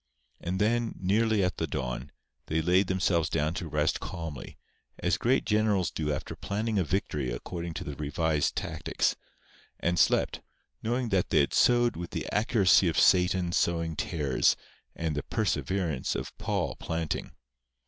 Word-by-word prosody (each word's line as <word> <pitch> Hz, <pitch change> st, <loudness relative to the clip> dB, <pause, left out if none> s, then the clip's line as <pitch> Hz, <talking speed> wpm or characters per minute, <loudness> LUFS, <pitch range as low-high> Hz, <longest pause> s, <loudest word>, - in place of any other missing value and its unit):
And 90 Hz, +2 st, -3 dB
then, 115 Hz, +2 st, +1 dB
nearly 105 Hz, +2 st, +2 dB
at 90 Hz, -, -1 dB
the 80 Hz, -, -1 dB
dawn, 65 Hz, -5 st, -4 dB, 0.4 s
they 80 Hz, -, 0 dB
laid 90 Hz, +4 st, +3 dB
themselves 95 Hz, -3 st, +1 dB
down 75 Hz, 0 st, 0 dB
to 90 Hz, -3 st, -4 dB
rest 75 Hz, 0 st, 0 dB
calmly, 80 Hz, -6 st, -7 dB, 0.4 s
as -, -, +1 dB
great 130 Hz, +3 st, +1 dB
generals 105 Hz, -4 st, +2 dB
do 75 Hz, -2 st, -2 dB
after 70 Hz, -, -4 dB
planning 105 Hz, +1 st, -1 dB
a -, -, +3 dB
victory 75 Hz, -6 st, -1 dB
according 85 Hz, +7 st, -5 dB
to -, -, -4 dB
the 70 Hz, -, -6 dB
revised 75 Hz, +1 st, 0 dB
tactics, -, -, -1 dB, 0.6 s
and 85 Hz, 0 st, 0 dB
slept, -, -, +2 dB, 0.4 s
knowing 120 Hz, +1 st, -1 dB
that 95 Hz, -3 st, +1 dB
they -, -, +4 dB
had -, -, 0 dB
sowed 120 Hz, -1 st, +4 dB
with 85 Hz, +1 st, -5 dB
the -, -, -4 dB
accuracy 100 Hz, -4 st, +4 dB
of 80 Hz, -, 0 dB
Satan 90 Hz, -1 st, +4 dB
sowing 85 Hz, -2 st, 0 dB
tares 75 Hz, -7 st, +1 dB, 0.4 s
and 80 Hz, -2 st, -2 dB
the 75 Hz, -, -1 dB
perseverance 85 Hz, -7 st, -1 dB
of -, -, -5 dB
Paul -, -, -1 dB
planting. 80 Hz, -1 st, -3 dB
85 Hz, 155 wpm, -29 LUFS, 80-100 Hz, 0.6 s, they